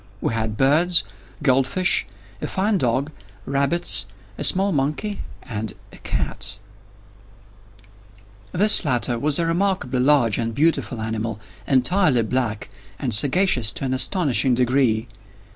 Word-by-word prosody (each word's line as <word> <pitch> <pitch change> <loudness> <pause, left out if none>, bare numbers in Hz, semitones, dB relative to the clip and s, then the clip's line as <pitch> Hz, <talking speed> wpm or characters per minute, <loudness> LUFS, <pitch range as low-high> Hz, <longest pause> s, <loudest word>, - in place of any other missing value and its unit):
We - - -2
had 110 -1 -3
birds, 165 +6 +3 0.4
gold 135 -1 +2
fish, 185 +6 +3 0.3
a - - -3
fine 195 +1 -1
dog, 130 +4 -1 0.3
rabbits, 140 +5 +2 0.3
a - - -6
small 195 +1 +2
monkey, 155 +8 -3 0.2
and 110 -3 -6 0.2
a - - -13
cat. 100 0 -3 1.9
This 210 +4 +5
latter 125 -4 -1
was 145 +1 0
a 170 - 0
remarkably 165 -7 -1
large 125 -5 +2
and 115 -1 -3
beautiful 145 -5 0
animal, 110 -1 -4 0.3
entirely 135 - +2
black, 110 -3 -3 0.3
and 130 -5 -3
sagacious 130 - +3
to - - -3
an 130 - -2
astonishing 130 -2 +1
degree. 125 -2 0
135 Hz, 125 wpm, -21 LUFS, 115-165 Hz, 1.9 s, This